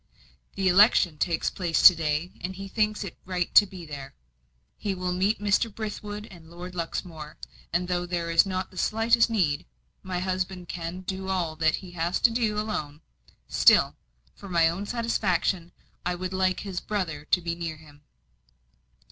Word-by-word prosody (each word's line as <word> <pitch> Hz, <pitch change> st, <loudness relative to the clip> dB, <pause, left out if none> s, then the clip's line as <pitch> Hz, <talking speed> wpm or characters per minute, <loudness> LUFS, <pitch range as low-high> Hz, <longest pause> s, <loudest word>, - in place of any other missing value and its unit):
"The 195 Hz, -1 st, 0 dB
election 180 Hz, -4 st, +5 dB
takes 170 Hz, -3 st, 0 dB
place 175 Hz, -4 st, 0 dB
to 185 Hz, -, +11 dB
day, 160 Hz, +1 st, -1 dB
and 190 Hz, +1 st, -4 dB
he 195 Hz, +1 st, -7 dB
thinks 215 Hz, +1 st, 0 dB
it 195 Hz, -, -8 dB
right 180 Hz, -2 st, -2 dB
to 205 Hz, -, +8 dB
be 185 Hz, -3 st, -10 dB
there. 140 Hz, -3 st, -8 dB, 0.6 s
He 200 Hz, -2 st, -3 dB
will 180 Hz, 0 st, -2 dB
meet 195 Hz, +4 st, +1 dB
Mr. 210 Hz, +2 st, +1 dB
Brithwood 210 Hz, 0 st, -6 dB
and 165 Hz, -3 st, -14 dB
Lord 175 Hz, +2 st, -9 dB
Luxmore; 165 Hz, -2 st, -5 dB, 0.3 s
and 180 Hz, +1 st, 0 dB
though 175 Hz, 0 st, -1 dB
there 170 Hz, -1 st, -2 dB
is 165 Hz, -, +6 dB
not 185 Hz, -1 st, -3 dB
the 185 Hz, -, -7 dB
slightest 225 Hz, +1 st, +3 dB
need 170 Hz, -, 0 dB, 0.3 s
my 185 Hz, -1 st, -4 dB
husband 185 Hz, 0 st, -3 dB
can 170 Hz, +2 st, -5 dB
do 190 Hz, +1 st, -5 dB
all 175 Hz, -4 st, -1 dB
that 160 Hz, -1 st, +3 dB
he 185 Hz, -2 st, -10 dB
has 175 Hz, +1 st, -1 dB
to 235 Hz, -, +5 dB
do 225 Hz, -3 st, 0 dB
alone 155 Hz, -9 st, -3 dB, 0.5 s
still, -, -, +5 dB, 0.4 s
for 200 Hz, -, -11 dB
my 170 Hz, -2 st, +4 dB
own 190 Hz, +5 st, -3 dB
satisfaction, 195 Hz, -7 st, 0 dB, 0.3 s
I 180 Hz, 0 st, -1 dB
would 185 Hz, +1 st, -5 dB
like 185 Hz, -1 st, +1 dB
his 190 Hz, -3 st, -4 dB
brother 175 Hz, -8 st, -3 dB
to 180 Hz, -, +3 dB
be 170 Hz, -1 st, -3 dB
near 165 Hz, -2 st, -5 dB
him." 150 Hz, -2 st, -17 dB
180 Hz, 175 wpm, -26 LUFS, 170-195 Hz, 0.6 s, to